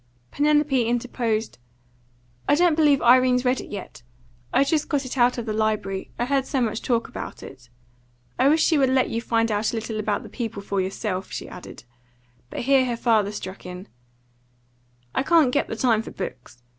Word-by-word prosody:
Penelope 295 -3 +2
interposed. 230 - -2 0.9
"I 290 - +6
don't 345 +1 +4
believe 295 -4 +3
Irene's 250 +1 +5
read 250 +1 +1
it - - -11
yet. 200 -9 -8 0.5
I've 275 - +3
just 305 0 0
got 285 -3 0
it 255 - -5
out 245 -1 +3
of 235 - -4
the 215 - -2
library; 215 -3 -1
I 240 - 0
heard 270 0 0
so 275 - -1
much 225 -3 -1
talk 235 -2 0
about - - -8
it. 125 -2 -12 0.7
I 270 - +5
wish 315 +2 +4
she 320 -4 +3
would 265 -2 +3
let 260 -1 +2
you 230 - -1
find 230 -1 +1
out 210 +1 0
a - - -4
little 225 -1 -4
about 210 -1 -1
the - - -9
people 225 -5 -5
for 200 -1 -1
yourself," 190 0 -3
she - - -5
added. - - -11 0.7
But - - -5
here 270 +1 +4
her 240 -2 -2
father 220 -4 +2
struck 190 -2 -7
in 180 +2 -8 1.3
"I - - +1
can't 310 -2 +4
get 285 - +1
the - - -4
time 225 -2 +2
for - - -9
books. 125 -9 -8
240 Hz, 195 wpm, -24 LUFS, 215-270 Hz, 1.3 s, I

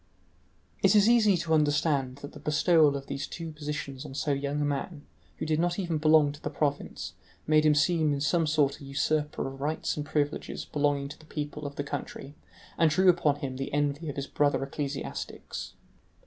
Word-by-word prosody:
It - - +5
is 205 0 +6
easy 220 -5 +5
to 165 -1 -1
understand 145 -3 +2
that 145 - -7
the 150 - -10
bestowal 150 0 +3
of 135 - -8
these 140 0 -4
two 165 -1 -6
positions 150 -3 -5
on 140 -3 -9
so 145 - -1
young 140 +1 -1
a 145 - +1
man, 145 +2 -3 0.3
who - - -3
did 155 0 +1
not 175 +1 +1
even 170 -5 -1
belong 155 -1 +5
to 145 - -12
the - - -3
province, 145 -2 -2 0.3
made 155 0 +4
him 150 - +5
seem 155 0 +3
in 140 - 0
some 160 +3 +1
sort 150 -2 +1
a - - -9
usurper 150 +2 -1
of 135 0 -8
rights 155 +2 -1
and 150 - -3
privileges 145 0 -2
belonging 145 -1 0
to 145 - -10
the 155 - -16
people 150 -1 -5
of 140 - -9
the 145 - -2
country, 140 0 -6 0.5
and 165 - +5
drew 185 +5 +4
upon 160 -5 +3
him 130 -2 -4
the 135 - -4
envy 145 +2 -1
of 145 - -5
his 140 - -3
brother 145 -1 +1
ecclesiastics. 140 0 -5
150 Hz, 200 wpm, -28 LUFS, 140-155 Hz, 0.5 s, is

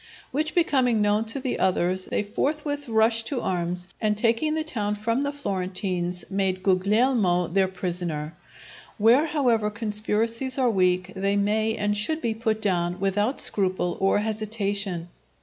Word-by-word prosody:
Which 305 +3 -1
becoming 260 -9 +3
known 210 +1 +2
to 225 +5 0
the 260 -1 -3
others, 185 0 +1
they - - -1
forthwith 290 +5 -2
rushed 225 0 +2
to 270 -2 -2
arms, 180 0 -2
and 210 -1 +1
taking 235 +8 +1
the 315 - -1
town 210 -9 -2
from 230 +5 -1
the 285 0 -1
Florentines, 185 -7 -3
made 190 -1 -1
Guglielmo 200 -1 +2
their 190 +2 +2
prisoner. 175 -4 -4 0.6
Where, 240 +8 +4
however, 245 -8 +1
conspiracies 225 +4 -1
are 255 -3 +2
weak, 185 -1 +1
they 195 +1 0
may 215 +2 +1
and 205 0 0
should 310 +10 +1
be 230 -6 -1
put 220 -1 -2
down 175 -2 0
without 205 +6 0
scruple 185 -3 +1
or 195 +1 +3
hesitation. 205 -4 -2
210 Hz, 150 wpm, -25 LUFS, 185-235 Hz, 0.6 s, Where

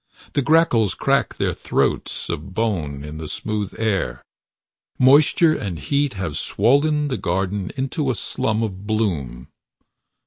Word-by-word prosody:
The 140 - +2
grackles 135 - +3
crack - - +1
their - - 0
throats - - -1
of 95 +5 -5
bone 80 -11 -1
in 75 +1 -7
the 80 - -6
smooth 105 +3 -3
air. 95 - -1 0.7
Moisture 150 +6 +5
and 95 - -4
heat 140 - 0
have 90 -6 -3
swollen 145 +7 +2
the 130 - -2
garden 95 +2 -1
into 135 +2 -1
a 130 - +1
slum 110 +2 -1
of 100 -2 -5
bloom. 80 - -2
105 Hz, 135 wpm, -22 LUFS, 90-135 Hz, 0.7 s, Moisture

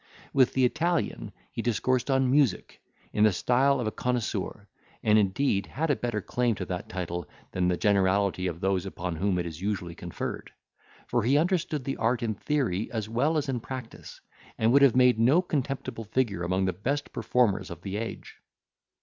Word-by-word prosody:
With 130 -3 +4
the 130 -1 +3
Italian 160 - -1 0.2
he - - -4
discoursed 125 +3 0
on 130 -1 +3
music, 135 -9 +1 0.3
in 105 - +3
the 110 - +6
style 130 +8 +2
of 120 - -1
a 110 - -1
connoisseur; 110 -5 -2 0.4
and 110 0 +5
indeed 100 +1 +1
had 155 +3 -1
a - - +3
better 120 -4 -2
claim 120 -2 0
to 95 - -4
that 90 +1 -5
title 85 -3 -4 0.2
than 90 -1 0
the 90 -1 +1
generality 100 -2 +2
of 85 0 -5
those 95 -2 0
upon 90 -2 -4
whom 95 +1 +1
it 90 - -1
is 80 0 -7
usually 95 -4 -2
conferred; 85 0 -6 0.5
for 120 - 0
he 130 +6 +3
understood 165 -3 0
the 135 +1 -3
art 115 +2 +1
in 110 -2 0
theory 110 -5 -1
as 110 -3 -3
well 140 +8 +1
as 150 -1 -1
in 130 -3 -1
practice, 125 0 -8 0.4
and 110 +1 +3
would 140 - +6
have 140 -4 +6
made 125 -3 +5
no 130 +9 +5
contemptible 135 -8 -3
figure 105 -5 0
among 90 +2 0
the 95 - 0
best 140 +11 -3
performers 105 -6 +1
of 85 0 -9
the 100 +1 -3
age. 115 +1 -6
115 Hz, 185 wpm, -27 LUFS, 95-130 Hz, 0.5 s, the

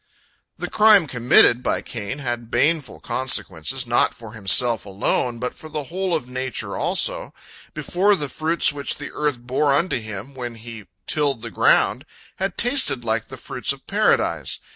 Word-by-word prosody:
" - - -40 0.2
The - - -4
crime 210 -4 +5
committed 125 -2 +4
by - - -1
Cain 115 +3 -6
had 120 -4 -4
baneful 150 +1 0
consequences, 130 -2 -2
not 120 0 +2
for 115 -2 -10
himself 110 +1 +4
alone, 105 +4 -1
but 125 +1 -4
for 155 - -11
the 150 -1 -4
whole 185 -2 0
of 145 -6 -3
nature 130 -1 -4
also. - - -1 0.4
Before, 200 +3 +2
the 150 -6 -2
fruits 160 +2 +1
which 140 -1 -3
the 145 - -8
earth 150 -3 -1
bore 130 +4 0
unto 165 -3 0
him 110 +3 -8
when 120 -3 -6
he 115 -2 -10 0.2
tilled 140 -6 0
the - - -6
ground - - +2 0.3
had 190 -1 -3
tasted 245 - +1
like 110 0 -1
the - - -9
fruits - - -2
of - - -16
Paradise. - - +1
130 Hz, 165 wpm, -22 LUFS, 115-150 Hz, 0.4 s, crime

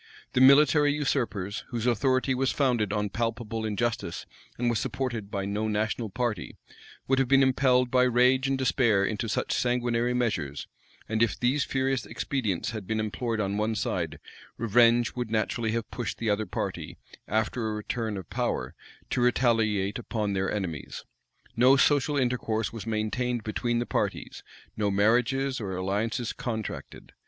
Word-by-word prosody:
The 130 - +3
military 145 +2 +6
usurpers, 115 -9 -1
whose 120 -1 -3
authority 130 +2 +2
was 130 +1 +1
founded 120 -8 +1
on 105 -1 -1
palpable 115 0 -2
injustice, 110 +2 -2 0.3
and 120 - 0
was 120 -2 +1
supported 120 -5 -3
by 100 -1 -3
no 105 +2 -1
national 110 +1 -1
party, 115 -3 -3 0.5
would 135 0 +2
have 135 - +2
been 135 +1 +5
impelled 125 -1 +3
by 125 -1 +4
rage 125 +2 +3
and 135 0 +1
despair 120 -6 +2
into 110 +2 -2
such - - -1
sanguinary 120 0 0
measures; 85 - -1 0.4
and 110 0 -1
if 115 - +1
these 130 +3 +1
furious 135 -1 -1
expedients 110 -11 -2
had 110 -5 -6
been 110 0 -1
employed 110 +1 -2
on 100 -1 -1
one 110 +1 0
side, - - -2 0.4
revenge 115 +1 +4
would 125 -3 -3
naturally 110 +1 -1
have 115 -1 -3
pushed 120 -4 -4
the 115 -2 0
other 105 0 -1
party, - - -4 0.3
after 110 +2 0
a 110 - -2
return 105 0 -3
of 95 -4 -7
power, - - -2 0.4
to - - +1
retaliate 115 -5 +2
upon 110 -3 -2
their 95 0 0
enemies. 90 -9 -4 0.5
No 130 +4 +6
social 145 +1 +3
intercourse 120 -4 -1
was 115 -2 -7
maintained 115 +2 -1
between 120 +2 -1
the 120 - 0
parties; - - -3 0.3
no 105 -1 0
marriages 125 +6 +2
or 95 -3 -4
alliances 105 +6 -1
contracted. 110 -3 -6
115 Hz, 155 wpm, -27 LUFS, 105-125 Hz, 0.5 s, military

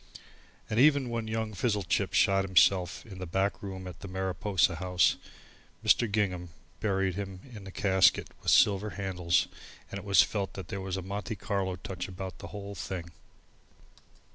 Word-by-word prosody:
And 110 - 0
even 140 -2 +5
when 115 -1 -2
young 110 0 -2
Fizzlechip 105 -2 0
shot 95 0 +4
himself 95 -1 +3
in 95 -5 -10
the 90 - -5
back 95 +1 0
room 95 -2 -6
of 90 - -8
the 100 - -8
Mariposa 95 -1 0
House, 90 +1 +2 0.7
Mr. 115 -3 +4
Gingham 90 -4 0 0.3
buried 95 -3 0
him 95 -1 -6
in 100 -2 -9
a - - -8
casket 95 -3 +3
with - - -1
silver 105 +1 +4
handles 90 -3 +1 0.4
and 100 - -4
it - - -10
was 100 -1 +6
felt 100 -3 -3
that 95 -3 -8
there 100 - -4
was 95 0 -3
a 95 - -4
Monte 100 +4 -4
Carlo 95 -1 -2
touch 90 -1 -6
about 95 0 -7
the - - -8
whole 100 -1 -7
thing. 90 -3 -5
95 Hz, 165 wpm, -30 LUFS, 90-100 Hz, 0.7 s, was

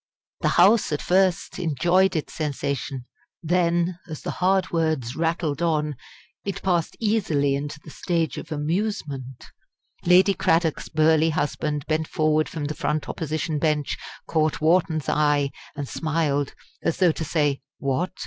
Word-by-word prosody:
The - - +1
House 200 +4 +5
at 150 - 0
first 185 0 +1
enjoyed 175 +4 +2
its 155 - -3
sensation. 140 -3 -3 0.4
Then, 170 +1 +1
as 155 -3 -7
the - - -2
hard 190 0 +2
words 155 -7 0
rattled 165 -2 -1
on, 150 -3 +1 0.5
it 200 -2 -4
passed 175 -4 0
easily 175 -11 +1
into 145 +2 -4
the 155 - -13
stage 165 -2 -1
of 160 - -10
amusement. 150 - -3 0.6
Lady 185 +3 +5
Cradock's 165 -3 +1
burly 160 +1 +3
husband 150 -1 -1
bent 155 0 0
forward 155 0 +1
from 155 -3 -4
the 150 - -2
front 150 +1 -2
Opposition 155 0 -2
bench, 150 -2 0 0.3
caught 155 -1 +1
Wharton's 160 -2 +2
eye, 145 -2 +2 0.2
and 145 -2 -4
smiled, 150 -3 -1 0.3
as 165 - 0
though 180 -2 +4
to 160 - -4
say: 145 -3 0 0.2
"What! 140 +7 -1
155 Hz, 140 wpm, -24 LUFS, 145-175 Hz, 0.6 s, House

